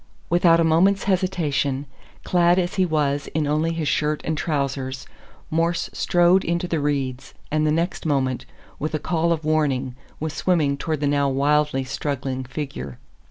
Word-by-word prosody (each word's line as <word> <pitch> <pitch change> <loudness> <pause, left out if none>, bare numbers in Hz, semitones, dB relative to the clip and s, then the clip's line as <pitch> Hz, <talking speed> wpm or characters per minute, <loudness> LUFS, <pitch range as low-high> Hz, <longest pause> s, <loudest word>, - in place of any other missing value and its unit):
Without 170 -1 +5
a - - +4
moment's 180 +5 +3
hesitation, 160 -8 0 0.4
clad 175 0 +3
as 180 +1 0
he 185 -2 +2
was 145 -3 0
in 155 -1 +1
only 155 +3 +1
his 165 -2 -2
shirt 150 +1 +1
and 160 - -1
trousers, 135 -3 -2 0.5
Morse 165 +2 0
strode 175 +1 +3
into 170 +1 -1
the 165 -2 -1
reeds, 135 -3 -2 0.2
and 155 0 +2
the - - +3
next 170 +4 -1
moment, 130 -4 0 0.3
with 155 +1 -2
a - - -1
call 170 +2 0
of 160 -2 -1
warning, 145 -5 +1 0.3
was 155 0 -3
swimming 155 -5 +1
toward 155 +1 -3
the 145 - +1
now 140 -1 +2
wildly 145 0 +2
struggling 130 -1 -3
figure. 70 - -6
155 Hz, 160 wpm, -23 LUFS, 140-170 Hz, 0.5 s, Without